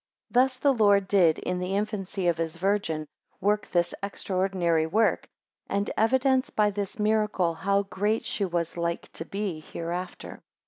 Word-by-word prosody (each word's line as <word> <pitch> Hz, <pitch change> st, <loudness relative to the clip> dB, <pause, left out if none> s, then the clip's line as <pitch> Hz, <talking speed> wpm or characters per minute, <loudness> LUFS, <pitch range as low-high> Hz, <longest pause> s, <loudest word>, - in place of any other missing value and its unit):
7 250 Hz, +1 st, +7 dB
Thus 260 Hz, -1 st, -7 dB
the 275 Hz, +1 st, +3 dB
Lord 205 Hz, -4 st, +4 dB
did, 180 Hz, -6 st, +4 dB
in 180 Hz, 0 st, -3 dB
the 180 Hz, +2 st, -2 dB
infancy 200 Hz, -2 st, -2 dB
of 170 Hz, -2 st, +1 dB
his 165 Hz, 0 st, -2 dB
Virgin, 185 Hz, -4 st, 0 dB, 0.3 s
work 205 Hz, +1 st, +1 dB
this 175 Hz, -1 st, +1 dB
extraordinary 185 Hz, -4 st, 0 dB
work, 220 Hz, +7 st, +1 dB, 0.4 s
and 200 Hz, +1 st, -1 dB
evidence 260 Hz, +3 st, +2 dB
by 210 Hz, -1 st, +2 dB
this 200 Hz, +3 st, -4 dB
miracle 210 Hz, -5 st, +1 dB
how 200 Hz, +4 st, +1 dB
great 205 Hz, +3 st, -1 dB
she 205 Hz, -, -1 dB
was 170 Hz, -2 st, -2 dB
like 170 Hz, 0 st, -3 dB
to 165 Hz, -, -6 dB
be 195 Hz, -3 st, -3 dB
hereafter. 175 Hz, +3 st, -6 dB
195 Hz, 155 wpm, -27 LUFS, 175-210 Hz, 0.4 s, 7